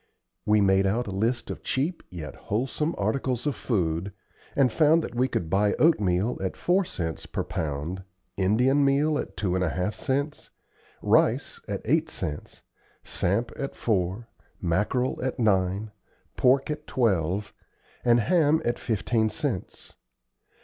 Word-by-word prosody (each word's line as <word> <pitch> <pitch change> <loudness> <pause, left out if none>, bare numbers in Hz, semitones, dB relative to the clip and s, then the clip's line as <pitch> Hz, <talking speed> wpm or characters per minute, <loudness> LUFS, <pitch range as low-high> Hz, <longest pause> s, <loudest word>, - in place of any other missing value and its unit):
We 105 0 +4
made 95 0 +4
out 115 +5 0
a 100 - -5
list 115 +6 -1
of - - -7
cheap, 155 +7 -1
yet 80 -5 -7
wholesome, 135 +9 -2
articles 125 +4 -1
of 145 - 0
food, 90 -4 -1 0.4
and 135 -4 +4
found 160 +3 +4
that - - -6
we 125 +2 +2
could 85 - -2
buy 100 +4 +2
oatmeal 105 - +2
at 95 - -3
four 185 +3 +2
cents 80 - -4
per - - -3
pound, 80 +4 -3 0.3
Indian 125 +9 +3
meal 145 +2 +2
at - - -6
two 95 -4 0
and 95 0 +1
a 90 - +1
half 90 +7 -1
cents, 140 +3 -2 0.5
rice - - +2
at - - -3
eight - - +2
cents, 75 0 -6 0.4
samp 100 +7 0
at 140 - -5
four, 100 +1 -1 0.3
mackerel 105 +9 0
at 130 0 -2
nine, 100 -1 +1 0.4
pork 135 +3 +3
at 150 0 -6
twelve, 100 -5 0 0.5
and 120 -1 +4
ham 155 - +3
at 120 - 0
fifteen 110 0 0
cents. 130 - -4
110 Hz, 145 wpm, -26 LUFS, 95-135 Hz, 0.5 s, We